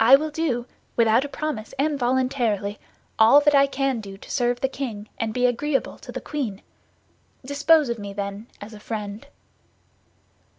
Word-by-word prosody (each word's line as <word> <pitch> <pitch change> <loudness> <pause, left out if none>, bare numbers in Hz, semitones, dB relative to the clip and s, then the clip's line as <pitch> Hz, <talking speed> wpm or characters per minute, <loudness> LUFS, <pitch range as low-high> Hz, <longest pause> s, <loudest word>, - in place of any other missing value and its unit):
"I 250 +4 +9
will 305 +2 -1
do, 290 -7 -1 0.3
without 230 +2 +4
a - - -6
promise 290 -8 -4
and 290 +1 0
voluntarily, 240 -5 0 0.4
all 225 +6 +8
that 295 0 +4
I 280 0 +6
can 275 -3 -1
do 195 -2 -9
to - - -12
serve 245 -2 +1
the 265 - +1
king 230 -6 -6
and 225 -1 -1
be 250 +2 +1
agreeable 270 +3 0
to - - -10
the - - -4
queen. 235 -10 -4 0.8
Dispose 290 +2 +4
of 235 -1 -3
me, 200 -1 -6
then, 200 +2 -5
as 210 +2 -9
a 210 - -10
friend." 210 +3 -6
245 Hz, 170 wpm, -24 LUFS, 215-280 Hz, 0.8 s, I